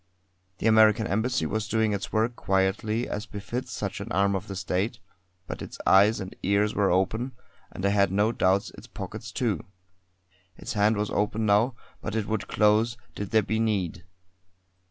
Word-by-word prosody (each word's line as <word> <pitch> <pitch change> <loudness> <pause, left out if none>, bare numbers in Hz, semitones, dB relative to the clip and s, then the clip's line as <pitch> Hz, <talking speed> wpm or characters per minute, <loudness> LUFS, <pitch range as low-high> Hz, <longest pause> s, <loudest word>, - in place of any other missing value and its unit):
The - - -5
American 110 0 +5
Embassy 120 +7 0
was 110 -1 -2
doing 110 -1 +1
its 100 0 -4
work 115 +2 +1
quietly 100 +4 0
as 105 +2 -4
befits 110 +5 -5
such - - -4
an - - -7
arm 100 +3 +2
of 95 +1 -4
the 100 - -6
State; 95 +5 -1 0.5
but - - -6
its - - -8
eyes 100 +3 +5
and 95 -2 -7
ears 100 +2 +2
were 100 -2 +2
open, 110 +8 0 0.4
and 95 - -5
I - - +4
had 100 -2 +3
no 105 +3 +2
doubts 95 -3 +1
its - - -13
pockets, - - -7
too. - - -1 0.9
Its - - -5
hand 105 0 +3
was 105 0 -1
open 105 +1 0
now; 110 +4 +3 0.3
but 110 - -4
it 110 -2 0
would 105 -2 -2
close, 110 +3 +3 0.2
did 100 -1 -5
there 110 -1 +3
be 110 +3 -1
need. 95 -7 -1
105 Hz, 175 wpm, -27 LUFS, 100-110 Hz, 0.9 s, American